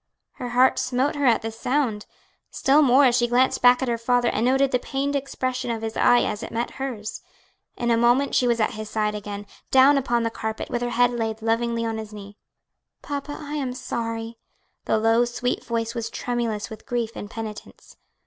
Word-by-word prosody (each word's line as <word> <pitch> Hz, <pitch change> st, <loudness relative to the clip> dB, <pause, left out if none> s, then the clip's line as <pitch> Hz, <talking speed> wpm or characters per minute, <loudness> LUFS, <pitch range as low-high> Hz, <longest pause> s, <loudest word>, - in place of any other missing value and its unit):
Her 245 Hz, -, -6 dB
heart 250 Hz, +2 st, +4 dB
smote 255 Hz, +3 st, 0 dB
her 285 Hz, -2 st, 0 dB
at 235 Hz, -1 st, +3 dB
the 225 Hz, -, -3 dB
sound; 230 Hz, -2 st, -1 dB, 0.4 s
still 285 Hz, +3 st, +3 dB
more 275 Hz, 0 st, +5 dB
as 245 Hz, -2 st, +4 dB
she 240 Hz, -1 st, +2 dB
glanced 250 Hz, +2 st, +2 dB
back 245 Hz, +1 st, +5 dB
at -, -, -1 dB
her 235 Hz, -1 st, -1 dB
father 245 Hz, +1 st, +2 dB
and -, -, -1 dB
noted 270 Hz, +1 st, +3 dB
the 250 Hz, -, +2 dB
pained 280 Hz, +2 st, -2 dB
expression 255 Hz, -2 st, -2 dB
of 225 Hz, -1 st, -3 dB
his 225 Hz, 0 st, -4 dB
eye 245 Hz, -, +5 dB
as 210 Hz, -, -3 dB
it 230 Hz, -, -6 dB
met 235 Hz, +1 st, -2 dB
hers. 225 Hz, -6 st, -5 dB, 0.6 s
In 240 Hz, 0 st, 0 dB
a 230 Hz, -, +3 dB
moment 245 Hz, +4 st, +3 dB
she 250 Hz, -, +3 dB
was 235 Hz, -1 st, +1 dB
at 215 Hz, -, +2 dB
his 215 Hz, -2 st, -7 dB
side 210 Hz, -1 st, 0 dB
again, 205 Hz, -1 st, -6 dB, 0.2 s
down 270 Hz, +2 st, +6 dB
upon 240 Hz, -3 st, 0 dB
the 230 Hz, -, -1 dB
carpet, 220 Hz, -1 st, -5 dB
with 240 Hz, -, -1 dB
her 245 Hz, -, -1 dB
head 245 Hz, +1 st, +3 dB
laid 225 Hz, -2 st, -3 dB
lovingly 230 Hz, +1 st, 0 dB
on 225 Hz, -1 st, -2 dB
his 215 Hz, -1 st, -8 dB
knee. 205 Hz, -1 st, -10 dB, 0.7 s
"Papa, 290 Hz, 0 st, -5 dB
I 295 Hz, -1 st, -7 dB
am 260 Hz, -3 st, -3 dB
sorry." 230 Hz, -1 st, -4 dB, 0.5 s
The -, -, +2 dB
low, 225 Hz, +2 st, +3 dB
street 245 Hz, +1 st, -2 dB
voice 230 Hz, -1 st, -2 dB
was 230 Hz, -2 st, -4 dB
tremulous 235 Hz, -4 st, -3 dB
with 220 Hz, -, -10 dB
grief 235 Hz, -2 st, -1 dB
and 205 Hz, -, -7 dB
penitence. 220 Hz, -2 st, -9 dB
240 Hz, 205 wpm, -24 LUFS, 225-255 Hz, 0.7 s, down